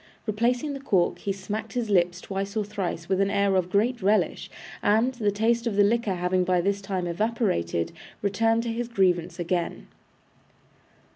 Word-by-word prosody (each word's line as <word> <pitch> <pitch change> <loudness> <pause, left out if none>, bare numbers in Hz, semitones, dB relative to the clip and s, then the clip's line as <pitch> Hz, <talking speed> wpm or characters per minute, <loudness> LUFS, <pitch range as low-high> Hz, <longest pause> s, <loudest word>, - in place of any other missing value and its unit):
Replacing 240 +6 0
the 275 - -5
cork, 195 -10 +1
he 200 - -2
smacked 195 +3 -5
his 240 -4 -2
lips 175 -1 +2
twice 195 +2 -4
or 210 - 0
thrice 190 -5 -4
with 190 0 +1
an 195 - +2
air 200 -1 +2
of 180 -1 +1
great 225 +5 +1
relish, 205 +3 +1 0.3
and, 225 +5 +3
the 225 -4 0
taste 230 +3 +1
of 220 - -1
the 205 - +5
liquor 215 -2 +1
having 180 +1 +1
by 180 0 +2
this 200 +3 0
time 190 -2 -3
evaporated, 175 - -1 0.3
recurred 225 +3 +2
to 230 -1 -2
his 240 +1 -3
grievance 185 -7 +1
again. 175 0 -2
200 Hz, 170 wpm, -26 LUFS, 185-225 Hz, 0.3 s, the